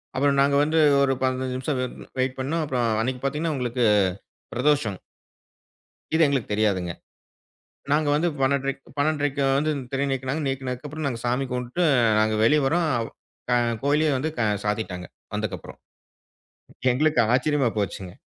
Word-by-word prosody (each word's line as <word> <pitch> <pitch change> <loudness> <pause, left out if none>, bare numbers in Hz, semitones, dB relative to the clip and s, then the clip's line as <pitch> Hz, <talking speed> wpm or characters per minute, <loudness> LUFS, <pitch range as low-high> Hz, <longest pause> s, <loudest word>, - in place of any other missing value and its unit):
அப்புறம் 140 +1 +2
நாங்க 140 0 +3
வந்து 155 +2 0 0.3
ஒரு 135 - +2
15 130 0 -1
நிமிஷம் 135 +1 -2
வ் 125 - -1 0.3
வெயிட் 130 0 0
பண்ணோம், 155 +5 -1
அப்புறம் 125 -4 0
அன்னைக்கு 125 +1 -2
பாத்தீங்கன்னா, 150 +3 -1
உங்களுக்கு 125 -1 -1 0.7
பிரதோஷம். 125 -7 +1 1.2
இது 165 - +4
எங்களுக்கு 135 -7 -1
தெரியாதுங்க. 100 -5 0 1.0
நாங்க 150 0 +2
வந்து 170 +4 +2
12:30க் 140 +1 0 0.2
12:30க்கு 145 -1 0 0.2
வந்து 155 +2 +1 0.2
திரை 140 +1 0
நீக்குனாங்க. 135 +4 -2
நீக்குனதுக்கு 130 0 -4
அப்புறம் 155 0 -4
நாங்க 120 -3 -4
சாமி 125 +3 0
கும்பிட்டுட்டு 125 +8 -1 0.4
நாங்க 110 0 +2
வெளியே 150 +5 +4
வரோம். 165 +3 +1 0.7
அ - - +4 0.3
கோயிலயே 150 +2 +3
வந்து 155 - -1 0.4
சாத்திட்டாங்க, 95 -4 -3 0.3
வந்ததுக்கு - - -2
அப்புறம். - - -12 1.1
எங்களுக்கு 150 +2 +2
ஆச்சரியமா 135 0 +2
போச்சுங்க. 95 -3 -3
135 Hz, 135 wpm, -24 LUFS, 125-150 Hz, 1.2 s, இது